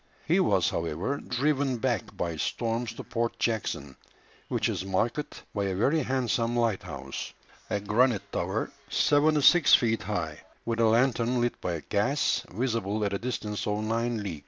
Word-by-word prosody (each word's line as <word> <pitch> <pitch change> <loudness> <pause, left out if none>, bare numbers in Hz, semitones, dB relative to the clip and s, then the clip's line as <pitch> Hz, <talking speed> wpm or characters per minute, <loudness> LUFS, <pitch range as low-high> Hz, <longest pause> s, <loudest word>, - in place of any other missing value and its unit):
He - - +3
was, - - +3
however, 85 - -2
driven 135 0 0
back 120 0 -2
by 85 -1 -2
storms 115 +7 -1
to - - -8
Port 115 0 -2
Jackson, 85 - -2 0.5
which - - 0
is - - -2
marked 115 +9 -2
by 100 -2 -1
a 95 -1 -1
very 140 - +2
handsome 120 -3 0
lighthouse, 90 - -2 0.4
a 105 - 0
granite 105 +2 +1
tower - - -2 0.2
seventy 150 +1 +3
six 175 +2 +7
feet 115 -2 +1
high, 80 -8 -3 0.3
with 115 -1 -1
a 115 - +5
lantern 120 +1 +2
lit 120 0 -1
by 85 -3 -3
gas, 125 +8 +1
visible 110 -1 -1
at 100 - -1
a 100 - -1
distance 105 -3 -3
of 105 +1 -1
nine 115 0 -1
leagues. 85 -7 -5
115 Hz, 160 wpm, -28 LUFS, 100-125 Hz, 0.5 s, six